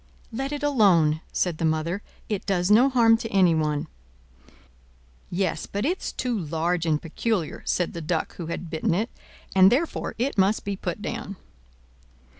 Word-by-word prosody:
"Let 270 +5 -3
it 290 0 -4
alone," 180 - +4
said 175 -4 -1
the - - -2
mother: 160 +4 0 0.3
"it 210 -3 -3
does 185 0 +1
no 245 +6 +6
harm 230 -3 +5
to 225 - -5
anyone." 160 -6 +2 1.4
"Yes, 185 -1 -1
but 205 +3 -3
it's 360 +5 -1
too 250 -2 -2
large 170 -1 -1
and 155 -2 +2
peculiar," 180 +2 -2
said 180 - 0
the 170 - -5
Duck 160 +1 -2
who 170 - -5
had 170 0 -5
bitten 160 +1 0
it; 220 +6 -1 0.4
"and 190 0 +7
therefore 300 +7 -1
it 245 -2 -1
must 195 +3 +2
be 200 -1 -2
put 205 +2 -5
down." 200 - -5
190 Hz, 160 wpm, -25 LUFS, 165-225 Hz, 1.4 s, and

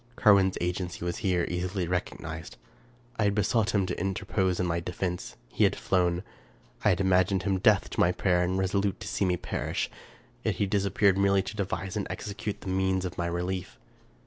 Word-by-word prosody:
Carwin's 100 -5 +5
agency 90 0 -3
was 85 -1 -2
here 90 -3 +1
easily 90 +1 -2
recognized. 85 -2 -4 0.6
I 110 - +2
had 100 0 +2
be 105 - +2
sought 110 +1 +1
him 100 -2 +3
to - - -3
interpose 95 -1 0
in 90 - +1
my 85 -1 0
defense. 90 +1 -4
He - - +1
had - - +4
flown. 90 -1 +1 0.6
I - - +5
had 90 - +2
imagined 95 0 +3
him 95 -1 +1
deaf 100 +1 +4
to - - -4
my 85 - +5
prayer, 90 0 +2
and 90 +1 0
resolute 95 +1 0
to - - -6
see - - 0
me 90 -1 +1
perish; - - -3 0.5
yet - - 0
he 100 - +1
disappeared 100 0 +2
merely 100 -1 +3
to 100 - -6
devise 95 -1 -3
and 105 - -2
execute 105 0 -5
the 95 - -6
means 95 0 +1
of 90 - -5
my 85 - 0
relief. 90 +1 -3
95 Hz, 195 wpm, -28 LUFS, 90-100 Hz, 0.6 s, Carwin's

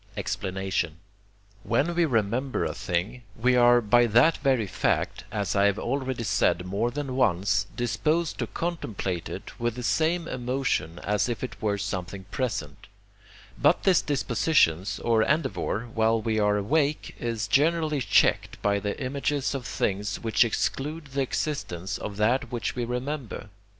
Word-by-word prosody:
Explanation 95 -3 -2 0.6
When 145 +10 +1
we 170 0 +3
remember 125 +1 0
a - - -2
thing, 95 +5 -2
we 125 +3 +2
are 120 0 +6
by 120 +2 +4
that 120 +9 +5
very 130 -5 +2
fact, 95 - -1
as 100 -3 -1
I 100 0 +4
have 100 0 +2
already 130 -1 -2
said 90 -4 +1
more 100 +6 0
than 135 0 -4
once, 95 -4 +2
disposed 150 +8 0
to - - -1
contemplate 110 - -3
it - - -8
with 120 -1 -1
the 125 - -6
same 165 +6 +1
emotion 125 - -1
as 105 +3 +1
if 120 - -3
it 125 -3 -6
were 105 -2 0
something 95 -1 -4
present; 105 - -3 0.7
but - - +4
this 185 -3 +4
disposition 130 - +2 0.2
or 115 -2 +3
endeavour, 140 -6 0
while 115 0 +2
we 110 0 0
are 105 0 +3
awake, 145 +8 0
is 115 -2 -2
generally 155 0 +2
checked 105 -5 +2
by 100 0 +2
the 100 0 -3
images 140 +1 -1
of 130 -3 -4
things 100 0 -1
which 115 +1 +3
exclude 150 +7 -2
the 140 - 0
existence 120 - -3
of 100 -1 -6
that 120 +4 +1
which 120 -2 -2
we 120 -1 -1
remember. 125 -3 -4
120 Hz, 150 wpm, -26 LUFS, 100-135 Hz, 0.7 s, are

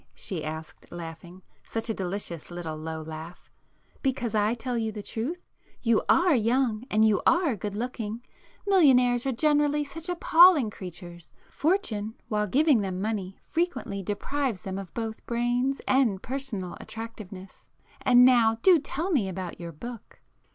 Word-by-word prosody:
she 170 -5 -4
asked 160 0 -7
laughing,—such 175 +6 -8
a 225 - 0
delicious 180 -4 -4
little 175 -3 -5
low 160 0 -5
laugh—"Because 180 - -6
I 215 +2 +2
tell 245 +1 -3
you 225 -1 -1
the 210 -1 -7
truth? 280 - -4 0.4
You 230 -3 +3
are 345 -1 +5
young 240 -1 +1
and 215 +1 +4
you 215 -2 +3
are 335 -7 +3
good 205 0 -5
looking! 230 -1 -4 0.4
Millionaires 260 -10 +4
are - - +2
generally 295 +2 +2
such 325 +5 -7
appalling 340 -7 +6
creatures. 175 -3 -10 0.2
Fortune, 225 - -1
while 210 -1 0
giving 280 - +4
them 185 -2 -3
money, 195 -2 -3
frequently 335 - -2
deprives 225 +3 -2
them 190 0 -4
of 195 -3 -8
both 225 -1 -4
brains 245 +3 0
and 245 -8 +2
personal 235 -9 -4
attractiveness. 215 -4 -9 0.3
And 250 -1 +6
now 235 -3 +5
do 365 -4 +7
tell 320 +6 -3
me 230 - +2
about 185 -1 -6
your 170 -1 -6
book!" 230 +9 -10
225 Hz, 145 wpm, -27 LUFS, 190-270 Hz, 0.4 s, do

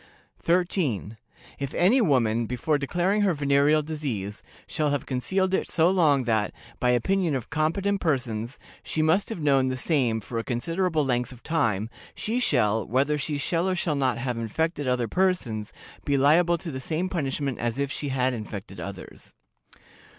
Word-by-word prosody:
"13. 165 - 0 0.4
If 140 -1 -4
any 215 +9 +4
woman, 120 - +2
before 135 +5 0
declaring 180 +8 +1
her 195 -4 +2
venereal 145 +1 +3
disease, 130 -10 -4 0.2
shall 155 -2 -1
have 145 -1 -1
concealed 185 +9 0
it - - 0
so 170 +1 +3
long 150 -8 +3
that, 110 -3 +1 0.3
by 125 - +2
opinion 160 +7 +1
of 130 - -5
competent 190 +6 0
persons, 125 -5 -1 0.2
she 155 - -1
must 165 +6 +2
have 225 - -5
known 135 -3 +3
the 130 0 -2
same 125 -6 +1
for 115 +3 -5
a - - -3
considerable 160 +6 0
length 125 -1 0
of 125 -2 -14
time, 110 -11 0 0.3
she 230 +3 -1
shall, 110 - +2
whether 140 +5 +1
she 145 +1 -2
shall 170 +5 0
or 185 - 0
shall 170 -3 0
not 130 -4 +1
have 120 -1 -3
infected 145 +6 -2
other 125 -2 +1
persons, 125 - 0 0.3
be 140 -1 +1
liable 165 +5 +4
to 170 0 -6
the 130 - -5
same 165 +6 -2
punishment 140 -6 -2
as 120 0 -2
if 140 0 -1
she 145 - -3
had 130 -1 +1
infected 105 -3 -7
others. 100 -2 -9
140 Hz, 170 wpm, -26 LUFS, 120-165 Hz, 0.4 s, any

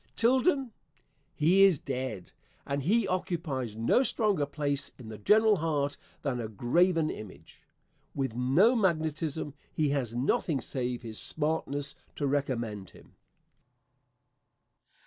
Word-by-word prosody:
Tilden? 260 +2 +2 0.6
He 175 +6 +5
is 190 -5 +6
dead, 130 -9 -5 0.3
and 140 0 -2
he 205 - +2
occupies 155 - -2
no 115 - +3
stronger 210 - +1
place 145 -1 -1
in 120 -4 -10
the 110 - -8
general 215 - +4
heart 150 -3 -1 0.3
than 130 -4 -1
a 115 - -3
graven 160 - +2
image. 105 -3 -11 0.5
With 135 -4 -1
no 140 - +4
magnetism, 160 - -1 0.2
he 150 -2 0
has 130 -5 -1
nothing 135 +3 0
save 125 0 -3
his 110 -2 -5
smartness 145 -2 -1 0.2
to 145 - -2
recommend 120 -8 -2
him. - - -19
145 Hz, 120 wpm, -29 LUFS, 125-175 Hz, 0.6 s, is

